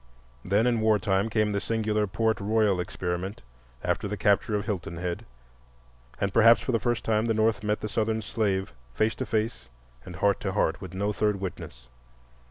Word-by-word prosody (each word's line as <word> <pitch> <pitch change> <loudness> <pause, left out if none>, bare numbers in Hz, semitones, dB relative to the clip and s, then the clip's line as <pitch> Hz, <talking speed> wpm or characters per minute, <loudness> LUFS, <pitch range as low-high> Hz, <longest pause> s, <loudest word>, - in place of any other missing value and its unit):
Then 100 +4 +2
in 120 -2 +2
war 110 -1 +4
time 100 +1 0
came 110 -1 +1
the 100 -1 -1
singular 110 -2 0
Port 110 +3 0
Royal 105 -2 +2
experiment 90 +2 -4 0.4
after - - -1
the 105 +1 -4
capture 105 +2 +2
of 100 -1 -1
Hilton 90 -5 -4
Head, 85 0 -4 0.9
and 100 0 -1
perhaps 115 -1 +7
for - - -2
the 115 - +2
first 120 -3 -1
time 110 0 +2
the 115 -1 +1
North 110 -1 +2
met 105 0 0
the 110 - -2
Southern 110 0 -1
slave 100 -3 -1 0.2
face 110 +7 +2
to - - -3
face 110 - -2 0.4
and 90 - -9
heart 100 +1 +2
to - - -3
heart - - 0
with 95 -1 -8
no 100 +2 0
third 105 0 0
witness. - - -7
105 Hz, 185 wpm, -27 LUFS, 95-110 Hz, 0.9 s, perhaps